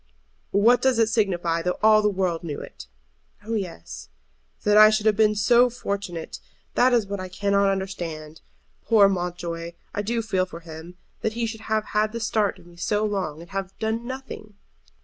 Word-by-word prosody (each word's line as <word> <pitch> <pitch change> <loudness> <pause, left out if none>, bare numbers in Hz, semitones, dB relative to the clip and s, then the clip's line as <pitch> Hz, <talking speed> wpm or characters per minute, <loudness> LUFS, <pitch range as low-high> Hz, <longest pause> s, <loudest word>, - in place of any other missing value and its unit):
"What 225 +5 +4
does 260 -2 +2
it 225 -1 +3
signify 175 -7 0
though 180 +1 -1
all 215 0 +6
the 210 - +2
world 185 -4 -1
knew 150 -4 -5
it?" - - -11 0.6
"Oh 225 - -3
yes." 175 - -5 0.5
"That 210 - +3
I 215 0 +9
should 215 0 0
have 215 -1 +4
been 215 0 +3
so 240 +4 +4
fortunate! 200 -8 -5 0.3
That 255 +1 +4
is 235 -4 +3
what 200 0 -5
I 185 0 -6
cannot 200 +1 +1
understand. 170 -6 -4 0.4
Poor 215 -4 +5
Mountjoy! 175 -2 -3 0.2
I 205 - -1
do 230 +2 -2
feel 185 -4 0
for 170 -1 -10
him. 165 +2 -11 0.2
That 220 - -1
he 235 0 -1
should 220 -1 -6
have 215 -1 -1
had 215 +1 +1
the 230 - -3
start 220 -2 0
of - - -18
me 175 0 -17
so 210 +4 0
long, 185 -7 -3
and 170 +3 -13
have 195 0 -5
done 225 +2 -2
nothing!" 260 -5 -8
200 Hz, 190 wpm, -24 LUFS, 175-220 Hz, 0.6 s, I